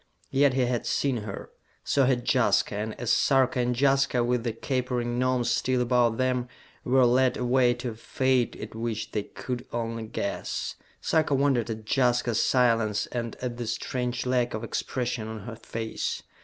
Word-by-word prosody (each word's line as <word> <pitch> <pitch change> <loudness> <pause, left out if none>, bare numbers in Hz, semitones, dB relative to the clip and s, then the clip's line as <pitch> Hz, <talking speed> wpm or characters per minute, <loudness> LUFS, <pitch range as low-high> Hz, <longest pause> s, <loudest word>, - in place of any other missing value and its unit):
Yet 135 -1 +3
he 130 - +2
had 120 -1 -1
seen 135 -3 +1
her. 105 -2 -7 0.3
So 140 -2 +2
had 125 -2 +1
Jaska, - - +3
and 105 +1 -4
as 120 -1 0
Sarka 130 -2 +3
and 125 0 0
Jaska, 135 -3 +3
with 120 -1 0
the 120 - -1
capering 120 0 -2
Gnomes 130 -1 +1
still 130 -1 +1
about 120 -2 +2
them, 125 -1 0 0.4
were 130 0 +4
led 125 +1 +3
away 125 0 +3
to 120 0 -4
a - - -6
fate 130 +2 0
at - - -8
which 115 -1 -3
they 105 - -1
could 120 +4 -6
only 115 -1 -3
guess, 100 -2 -3 0.3
Sarka 155 -3 +2
wondered 135 -4 +2
at 110 -1 -5
Jaska's 120 -1 +2
silence 115 -4 +2
and 115 -2 -3
at 120 -1 -3
the 120 -2 -4
strange 125 +2 -2
lack 125 -2 +1
of 110 - -5
expression 120 -3 -3
on 110 -1 -6
her 115 +3 -7
face. 115 0 -4
120 Hz, 170 wpm, -27 LUFS, 115-130 Hz, 0.4 s, were